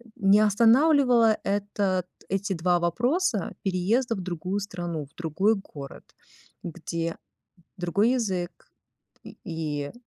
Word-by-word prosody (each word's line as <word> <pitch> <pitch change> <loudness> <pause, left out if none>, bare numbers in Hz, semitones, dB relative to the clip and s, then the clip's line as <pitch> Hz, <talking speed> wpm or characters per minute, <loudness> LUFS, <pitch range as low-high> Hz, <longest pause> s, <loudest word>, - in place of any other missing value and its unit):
не 200 +1 +4
останавливало 235 +2 +4
этот 200 -2 -1 0.2
эти 195 +1 -1
2 175 +1 +1
вопроса 235 - 0
переезда 215 +6 +1
в 190 - -5
другую 180 +3 -3
страну, 175 -6 -5
в - - -33
другой 175 +6 +1
город? 145 -8 -10 0.5
Где 165 0 -4 0.6
другой 200 +7 +1
язык, 190 -8 -3 0.5
и - - -11
и 150 -3 -4
195 Hz, 105 wpm, -26 LUFS, 175-220 Hz, 0.6 s, не